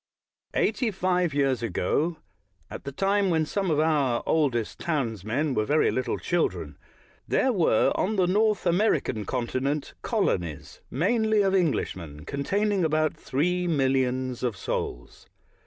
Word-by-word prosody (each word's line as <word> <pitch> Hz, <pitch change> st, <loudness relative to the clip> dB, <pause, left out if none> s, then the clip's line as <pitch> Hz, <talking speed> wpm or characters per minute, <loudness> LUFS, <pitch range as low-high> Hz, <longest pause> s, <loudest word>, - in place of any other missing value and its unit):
Eightj^ 225 Hz, +1 st, +1 dB
five 180 Hz, -2 st, +1 dB
years 135 Hz, -4 st, +1 dB
ago, 120 Hz, -, 0 dB, 0.5 s
at -, -, -8 dB
the 140 Hz, -, -4 dB
time 195 Hz, +6 st, +1 dB
when 160 Hz, -2 st, +2 dB
some 195 Hz, +3 st, -1 dB
of 150 Hz, -2 st, +2 dB
our 145 Hz, -6 st, +2 dB
oldest 130 Hz, -8 st, 0 dB
townsmen 130 Hz, -, -1 dB
were 110 Hz, -, +1 dB
very 150 Hz, +7 st, +2 dB
little 130 Hz, -, -1 dB
children, 175 Hz, -1 st, -1 dB, 0.5 s
there 260 Hz, -, +2 dB
were, 165 Hz, -, +3 dB
on 215 Hz, +4 st, 0 dB
the 185 Hz, -3 st, +3 dB
North 210 Hz, +3 st, +2 dB
American 175 Hz, -, +1 dB
continent, 130 Hz, +4 st, -2 dB
colonies, 85 Hz, -5 st, -2 dB
mainly 220 Hz, -3 st, +2 dB
of 195 Hz, -1 st, +1 dB
Englishmen, 90 Hz, -, -1 dB
containing 195 Hz, +8 st, 0 dB
about 155 Hz, -1 st, +1 dB
three 180 Hz, +6 st, -1 dB
millions 130 Hz, -4 st, 0 dB
of 120 Hz, -6 st, -1 dB
souls. -, -, -5 dB
155 Hz, 130 wpm, -26 LUFS, 130-185 Hz, 0.5 s, were